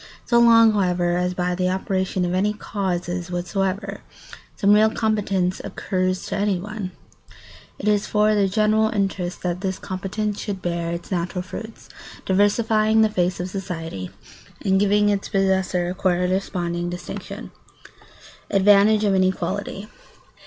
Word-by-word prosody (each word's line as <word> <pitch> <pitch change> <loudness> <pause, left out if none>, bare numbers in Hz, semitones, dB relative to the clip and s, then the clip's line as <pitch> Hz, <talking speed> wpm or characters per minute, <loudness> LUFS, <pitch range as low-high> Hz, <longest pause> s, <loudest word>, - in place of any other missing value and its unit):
So 235 -1 +4
long, 230 -1 +7
however, 180 -3 +1
as 180 0 -1
by 180 0 0
the 180 0 0
operation 190 0 -1
of 175 - -2
any 200 +3 +1
causes 180 -4 -3
whatever 195 +3 -2 0.5
some 205 0 +4
real 215 +1 +5
competence 200 -5 0
accrues 185 -1 -2
to - - -3
anyone, 205 0 -2 0.9
it - - -5
is 210 -1 +2
for 210 0 +3
the 205 -2 +3
general 215 +2 +2
interest 195 -4 -2
that 180 0 -2
this 190 -1 -2
competence 205 +2 -3
should 200 -3 -4
bear 170 -2 -2
its 170 +2 -6
natural 180 0 -2
fruits, 220 +4 -9 0.4
diversifying 215 +2 +3
the 220 - +3
face 180 -3 0
of 180 +1 -4
society 165 - -5 0.6
and 190 -1 +3
giving 205 +1 +3
its 200 -1 -1
possessor 190 -3 +1
a - - -3
corresponding 180 -1 -1
distinction. 175 0 -7 1.0
[Sidenote: 195 - +2
Advantage 205 +2 +5
of 205 -2 +2
inequality. 190 +2 -1
190 Hz, 140 wpm, -22 LUFS, 180-210 Hz, 1.0 s, long